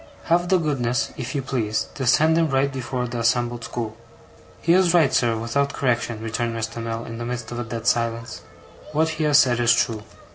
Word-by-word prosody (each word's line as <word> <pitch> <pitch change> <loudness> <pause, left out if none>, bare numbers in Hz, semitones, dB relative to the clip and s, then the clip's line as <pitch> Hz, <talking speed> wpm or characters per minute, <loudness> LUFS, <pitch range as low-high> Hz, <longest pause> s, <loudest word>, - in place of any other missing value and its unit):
Have 175 +1 +1
the 190 - +5
goodness, 130 -7 -1
if 125 +1 -5
you 140 - -1
please, 110 -5 -1
to 130 -3 -3
set 155 +6 +4
him 165 -1 +2
right 135 0 +1
before 130 -1 -3
the 120 0 -4
assembled 120 0 0
school.' 110 -3 -5 0.6
'He 170 - +3
is 180 -1 +4
right, 150 -6 +4
sir, 120 -3 +2
without 135 +5 -1
correction,' 120 -3 -1
returned 115 +1 -2
Mr. 115 +1 -4
Mell, 115 0 -4
in 115 0 -7
the - - -4
midst 120 -1 -5
of 120 - -4
a - - -2
dead 115 0 -6
silence; 115 -1 -1 0.5
'what 160 +2 +2
he 155 -1 -2
has 150 -2 +5
said 125 -4 +4
is 120 -1 +4
true. 115 -2 0
120 Hz, 210 wpm, -23 LUFS, 115-140 Hz, 0.6 s, the